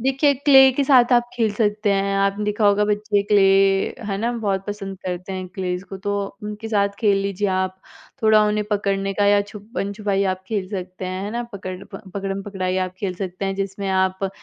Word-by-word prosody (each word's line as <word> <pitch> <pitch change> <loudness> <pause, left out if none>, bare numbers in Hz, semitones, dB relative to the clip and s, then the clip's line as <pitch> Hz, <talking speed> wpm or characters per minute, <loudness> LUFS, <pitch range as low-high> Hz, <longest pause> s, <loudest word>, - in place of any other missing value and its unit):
देखिए, 270 +3 +2
क्ले 270 -1 +7
के 280 +3 0
साथ 255 -2 +5
आप 240 - +5
खेल 225 -3 +1
सकते 210 -1 +1
हैं, 195 0 0
आपने 195 +1 +1
देखा 210 +1 +1
होगा 205 +1 +4
बच्चे 210 0 +1
क्ले 205 -1 +3 0.7
है 195 - -1
ना 230 +3 0
बहुत 200 -4 -2
पसंद 195 -2 -5
करते 180 +1 -4
हैं 185 -1 -5
क्लेज़ 180 0 -3
को 195 +1 -7
तो 205 - +1 0.3
उनके 210 +2 -6
साथ 200 -2 +2
खेल 205 -3 +3
लीजिए 200 0 -1
आप। 185 0 -2 0.4
थोड़ा 215 -1 +6
उन्हें 210 0 0
पकड़ने 195 -1 0
का 205 - +1
या 205 0 +5
छुपन-छुपाई 200 -2 -2
आप 185 - -21
खेल 200 -4 -2
सकते 185 -1 -6
हैं 185 +1 -4
है 205 - -4
ना, 235 +2 -2
पकड़ 185 -2 -6
प 195 - -10
पकड़म-पकड़ाई 195 -1 -3
आप 185 - -11
खेल 190 -3 -2
सकते 185 +1 -5
हैं 195 0 -1
जिसमें 195 0 -3
आप 190 0 +1
200 Hz, 200 wpm, -22 LUFS, 195-210 Hz, 0.7 s, क्ले